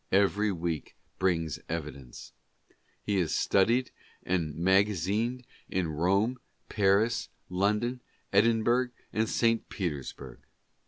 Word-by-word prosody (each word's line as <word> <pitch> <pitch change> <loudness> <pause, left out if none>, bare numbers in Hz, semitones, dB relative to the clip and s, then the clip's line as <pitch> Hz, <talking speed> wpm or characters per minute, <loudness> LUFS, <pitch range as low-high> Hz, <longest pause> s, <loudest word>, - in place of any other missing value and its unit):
Every 100 +2 +3
week 85 -3 -3 0.2
brings 80 -5 0
evidence. 75 -6 -6 0.7
He 100 -1 0
is 85 -4 +1
studied 115 +6 +2 0.3
and 85 -5 -1
magazined 100 +7 +1 0.3
at 95 -1 0
Rome, 95 +10 +1 0.3
Paris, 105 +3 +2 0.2
London, 105 +7 0 0.3
Edinburgh 115 +4 +3 0.2
and 110 0 +1
St. 115 -1 +1
Peters 75 -9 -3
burg. - - -11
100 Hz, 100 wpm, -29 LUFS, 85-115 Hz, 0.7 s, Every